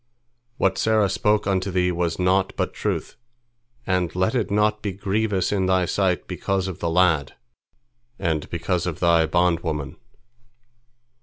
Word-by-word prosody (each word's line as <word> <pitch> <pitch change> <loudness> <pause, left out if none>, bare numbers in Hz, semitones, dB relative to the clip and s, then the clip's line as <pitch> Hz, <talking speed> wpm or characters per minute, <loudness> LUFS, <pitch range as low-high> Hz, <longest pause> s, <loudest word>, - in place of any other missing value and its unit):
What 95 0 +1
Sarah 110 -3 +2
spoke 105 +2 +1
unto 95 -1 0
thee 90 -1 +1
was 85 -1 -1
naught 95 +1 +1
but - - -1
truth, - - -3 0.7
and 90 -3 0
let 95 +4 +1
it 120 -5 0
not 105 +1 +1
be 100 -3 -3
grievous 100 0 -1
in 95 -2 +1
thy 95 -1 +2
sight 90 0 0
because 95 -1 -2
of 95 - -6
the 85 - -1
lad, 80 -5 +2 0.8
and 80 -5 -2
because 85 +1 -1
of 85 - -4
thy 85 -2 +3
bondwoman." 80 -4 0
90 Hz, 145 wpm, -23 LUFS, 85-100 Hz, 0.8 s, thy